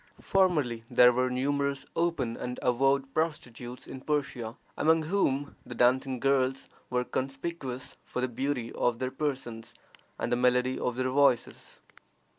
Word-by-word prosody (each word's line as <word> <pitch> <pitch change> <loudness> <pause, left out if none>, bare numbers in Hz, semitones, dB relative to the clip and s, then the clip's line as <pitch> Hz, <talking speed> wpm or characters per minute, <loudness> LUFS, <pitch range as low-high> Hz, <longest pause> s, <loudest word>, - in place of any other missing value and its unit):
Formerly 150 -12 +1
there 125 -1 +7
were 125 +1 +1
numerous 140 +2 0
open 165 -9 0
and 125 0 -5
avowed 135 +2 +2
prostitutes 125 -6 -3
in 130 - -8
Persia, 140 -6 -2 0.2
among 160 +1 +3
whom 150 -5 0
the 120 - -9
dancing 130 +2 +2
girls 135 0 +1 0.2
were 125 0 +1
conspicuous 135 0 -4
for - - -5
the 130 - +1
beauty 125 -1 -2
of 120 -1 +1
their 130 +1 -2
persons 125 -6 -4 0.4
and - - -2
the - - +4
melody 125 +1 +2
of 125 - -1
their 130 0 0
voices. 140 -3 +1
130 Hz, 140 wpm, -29 LUFS, 125-140 Hz, 0.4 s, there